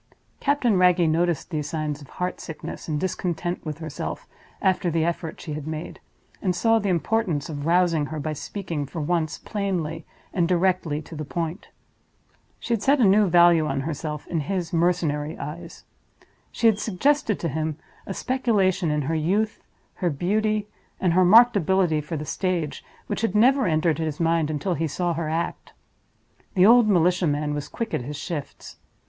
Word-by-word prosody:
Captain 250 -8 +2
Wragge 180 -2 +4
noticed 170 +1 0
these 150 -2 -2
signs 150 -2 -3
of 140 - -13
heart 180 0 -3
sickness 160 - -7
and 150 -2 -1
discontent 175 -1 -2
with 155 -3 -5
herself, 160 -3 -6 0.3
after 185 -2 +1
the 165 -1 +1
effort 165 -1 -3
she 155 - -6
had 150 0 -6
made, 155 +1 -6 0.4
and 185 -3 0
saw 225 +4 +3
the 205 -2 -1
importance 175 -3 0
of 145 -1 -4
rousing 170 -3 +3
her 155 +1 -5
by 155 +1 -3
speaking, 165 -2 -5
for 160 - -6
once, 160 0 -1
plainly 175 -6 -3 0.3
and 175 -3 +2
directly 175 -4 +1
to 160 - -10
the 155 - -4
point. 165 +4 -4 0.9
She 235 - -2
had 225 - 0
set 280 +4 +3
a - - +4
new 200 +1 +5
value 170 -2 +5
on 135 -1 -1
herself 150 0 -4
in 170 - -2
his 175 +2 -3
mercenary 165 -3 0
eyes. 165 +3 -8 0.7
She - - -3
had 220 -2 +5
suggested 225 +2 +1
to 170 - -2
him 155 0 -2 0.3
a 195 - -4
speculation 210 -9 +1
in 150 -1 0
her 155 +5 -2
youth, 195 +8 0 0.4
her 180 - 0
beauty, 210 +7 0 0.3
and 180 -3 +2
her 185 +1 +5
marked 230 +6 +7
ability 185 -4 +2
for 150 +2 -5
the 150 - -5
stage, 175 -4 -2 0.2
which - - -3
had 225 -3 0
never 260 +5 +4
entered 160 -1 +1
his 155 -2 -3
mind 165 -2 +2
until 155 +5 -1
he 165 0 -1
saw 175 +3 -1
her 160 -1 -3
act. 165 +2 -3 0.8
The 185 0 +6
old 235 0 +7
militia 180 -1 +3
man 150 0 0
was 145 -1 -4
quick 225 -2 -5
at - - 0
his 145 +4 -6
shifts. 145 0 -6
170 Hz, 175 wpm, -24 LUFS, 155-190 Hz, 0.9 s, marked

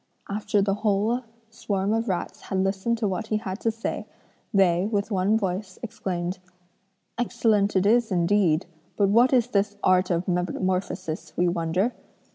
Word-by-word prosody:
After 205 0 0
the 195 0 +1
whole 215 +3 +1 0.3
swarm 200 -2 -1
of 225 0 0
rats 180 - -3
had 190 -1 -1
listened 195 +4 0
to 220 -2 0
what 200 +3 -3
he 215 - +1
had 195 -2 -5
to 230 - +1
say, 225 +1 -4 0.4
they, 190 -3 +3
with 205 +1 -1
one 200 +3 +2
voice, 190 -1 -3
exclaimed: 185 -4 -3 0.8
'Excellent 220 -4 +1
it 190 0 +3
is 230 +1 +3
indeed, 175 -2 +2 0.3
but 200 -2 +3
what 235 +5 +5
is 245 -2 +3
this 205 -2 0
art 185 0 +3
of 175 0 0
metamorphosis 180 -2 -2
we 180 - +3
wonder? 175 +6 0
200 Hz, 155 wpm, -25 LUFS, 185-220 Hz, 0.8 s, what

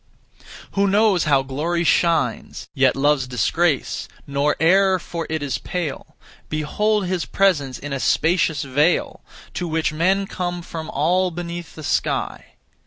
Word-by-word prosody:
Who 200 0 +1
knows 200 -3 +3
how 140 -3 +3
glory 160 +6 -2
shines, 170 0 +1
Yet 135 -3 +3
loves 135 -1 +2
disgrace, 135 +6 0 0.2
nor 140 +1 0
e'er 190 +4 +4
for 170 -1 -6
it 160 -2 -2
is 130 -6 -2
pale; 170 -6 -5 0.3
Behold 205 +7 0
his 180 -2 -2
presence 145 -10 +1
in 145 0 -6
a 135 - -2
spacious 160 +1 +1
vale, 145 +5 +1 0.3
To 175 - -3
which 160 -1 -1
men 190 +5 +1
come 175 -2 -4
from 160 -1 -7
all 180 +6 +1
beneath 175 -1 -7
the 155 - -9
sky. - - -2
165 Hz, 140 wpm, -21 LUFS, 145-180 Hz, 0.3 s, e'er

